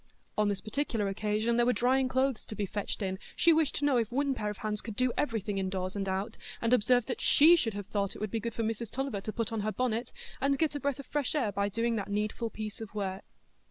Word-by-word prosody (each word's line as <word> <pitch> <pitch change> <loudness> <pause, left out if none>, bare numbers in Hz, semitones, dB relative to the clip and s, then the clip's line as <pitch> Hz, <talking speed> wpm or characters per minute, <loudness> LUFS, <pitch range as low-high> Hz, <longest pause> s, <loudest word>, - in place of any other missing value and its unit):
On 210 -1 +2
this 200 -1 -1
particular 220 -2 -1
occasion 215 +3 0
there 240 - +4
were 250 - +4
drying 260 +2 +3
clothes 260 -2 +1
to 215 - -6
be 205 - -1
fetched 205 +1 -3
in; 190 -1 -2 0.2
she 335 - +5
wished 315 -2 +2
to 290 - 0
know 280 -3 +4
if 230 -2 0
one 275 +2 +1
pair 210 -5 -2
of 210 - -5
hands 210 0 -2
could 220 -2 -6
do 255 0 +1
everything 215 -7 -1
in 190 -1 -1
doors 185 0 -3
and 195 -1 -1
out, 190 +2 -2 0.2
and 230 +1 +1
observed 245 0 +4
that 250 - -3
she 320 +4 +7
should 225 -10 0
have 205 -1 -4
thought 200 -1 -1
it - - -8
would 215 -2 -3
be 225 - 0
good 230 +1 -4
for 230 - -1
Mrs 225 0 -2
Tulliver 265 -6 -2
to 215 - -4
put 230 0 -2
on 225 - -1
her 215 +1 0
bonnet, 240 0 -1 0.3
and 275 0 +2
get 315 -1 +1
a 290 - -3
breath 280 -2 -1
of 280 - -7
fresh 295 0 -1
air 245 -9 +1
by 200 0 0
doing 230 +2 0
that 200 - -3
needful 210 +3 -1
piece 215 0 -6
of 215 -1 -8
work. 195 -1 -3
225 Hz, 265 wpm, -31 LUFS, 205-255 Hz, 0.3 s, she